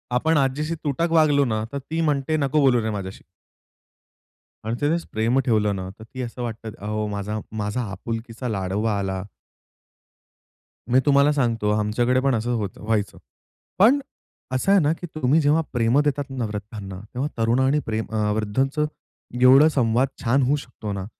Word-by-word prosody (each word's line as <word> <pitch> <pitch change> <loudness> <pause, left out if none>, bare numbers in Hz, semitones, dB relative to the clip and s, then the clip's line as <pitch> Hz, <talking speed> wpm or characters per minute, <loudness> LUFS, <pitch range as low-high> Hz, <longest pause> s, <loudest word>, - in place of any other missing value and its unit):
आपण 160 +5 +2
आजीशी 145 +4 0
तुटक 155 +3 0
वागलो 150 -3 +4
ना 110 -3 -1
तर 140 - -3
ती 160 +5 -3
म्हणते, 150 0 +1
"नको 140 +1 +1
बोलू 125 -4 +4
रे 110 - -2
माझ्याशी!" 100 -2 -6 1.4
आणि 110 +2 -2
त्यानेच 160 +4 0
प्रेम 115 +4 +1
ठेवलं 105 -4 +2
ना, 95 -1 -5
तर - - -10
ती 130 +3 -8
असं 125 0 -6
वाटतं, 115 -1 -5
"अहो 105 +1 -2
माझा 105 +1 -3 0.2
माझा 105 +5 -2
आपुलकीचा 115 +5 -5
लाडोबा 100 +1 -1
आला." 95 -1 -3 1.7
मी 130 - +6
तुम्हाला 140 +1 +5
सांगतो 115 -6 0
आमच्याकडे 120 +4 +1
पण 135 -2 +2
असं 115 +2 -1
होतं 100 -4 -4
व्हायचं. 105 -3 -1 0.6
पण 250 +8 +6
अ, 270 - -12
असं 160 +9 +1
आहे 200 - +6
ना, 150 +1 +2
की 175 - -8
तुम्ही 150 +1 +3
जेव्हा 150 +3 +3
प्रेम 120 +3 +3
देतात 145 -1 0
ना 130 -3 -3
वृद्धांना, 105 -2 -7
तेव्हा 130 +4 -1
तरुण 115 +2 +2
आणि 135 +3 +3
प्रेम 110 0 -2
अ, 105 -1 0
वृद्धांचं 135 +8 0 0.6
एवढं 135 +4 +8
संवाद 125 -3 +2 0.2
छान 130 +4 +3
होऊ 135 +3 +2
शकतो 110 -7 -7
ना, 95 -1 -4
125 Hz, 165 wpm, -23 LUFS, 110-145 Hz, 1.7 s, एवढं